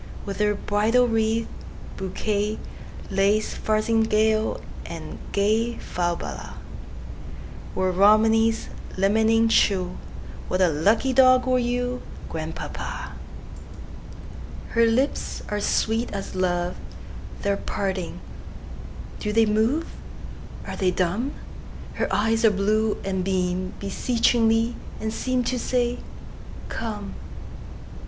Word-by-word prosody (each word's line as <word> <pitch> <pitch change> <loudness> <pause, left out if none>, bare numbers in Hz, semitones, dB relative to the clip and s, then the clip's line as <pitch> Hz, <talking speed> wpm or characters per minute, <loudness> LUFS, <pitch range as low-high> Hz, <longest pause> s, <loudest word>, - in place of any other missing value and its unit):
With 200 0 -5
her 210 0 +2
bridal 220 +5 +2
wreath, 225 0 +1 0.5
bouquet, 205 +2 -1 0.5
Lace 200 +2 +2
farthingale, 220 0 +2 0.2
and - - -7
gayFalbala, 205 -4 -1 1.2
Were 185 0 +1
Romney's 220 +4 +4 0.3
limning 220 +3 +3
true, 185 -5 +2 0.5
What 185 - -1
a 185 -2 +5
lucky 205 - +2
dog 255 -1 +6
were 255 -1 +3
you, 245 +1 -1 0.3
Grandpapa! 160 - -5 1.6
Her 230 0 +4
lips 255 +5 0
are 210 - -1
sweet 225 +3 +1
as 195 -1 -5
love; 180 -1 0 0.7
They 200 - +2
are 200 - 0
parting! 190 -4 -3 1.0
Do 210 - -2
they 225 +1 +4
move? 225 +10 +2 0.8
Are - - -5
they 185 - +2
dumb? 190 +10 0 0.6
Her - - -2
eyes 225 +3 +2
are 225 - +7
blue, 210 +2 +1
and 190 -1 -1
beamBeseechingly, 200 +5 +1 0.3
and 220 0 -2
seemTo 255 +1 -1
say, 245 0 0 0.7
"Come!" 210 -3 -4
215 Hz, 95 wpm, -24 LUFS, 195-230 Hz, 1.6 s, are